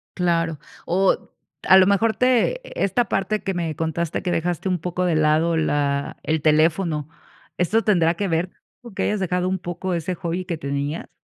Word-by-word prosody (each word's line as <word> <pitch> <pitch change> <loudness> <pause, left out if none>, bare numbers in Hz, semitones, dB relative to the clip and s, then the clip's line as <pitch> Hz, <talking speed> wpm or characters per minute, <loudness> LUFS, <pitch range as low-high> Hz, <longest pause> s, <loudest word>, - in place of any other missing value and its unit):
Claro, 165 -3 0 0.3
o 190 +2 +2 0.5
a 190 - +7
lo 185 -1 +6
mejor 220 +3 +2
te 255 - +2 0.2
esta 215 +5 +1
parte 200 +1 -1
que 195 - -2
me 165 -3 -3
contaste 160 +1 -2
que 180 - -1
dejaste 175 +2 -1
un 180 -1 0
poco 180 +2 -2
de 175 -3 +1
lado 155 +2 +2
la 145 -2 0
el 155 0 0
teléfono, 155 0 +2 0.5
¿esto 210 +6 +1
tendrá 170 -6 +3
que 200 +3 -2
ver 170 +1 -1 0.3
con 235 -4 -12
que - - -1
hayas 210 - 0
dejado 180 -1 0
un 190 0 -1
poco 175 +1 -4
ese 170 +2 -2
hobby 175 0 -3
que 175 -3 -3
tenías? 140 +2 -4
175 Hz, 180 wpm, -22 LUFS, 160-190 Hz, 0.5 s, a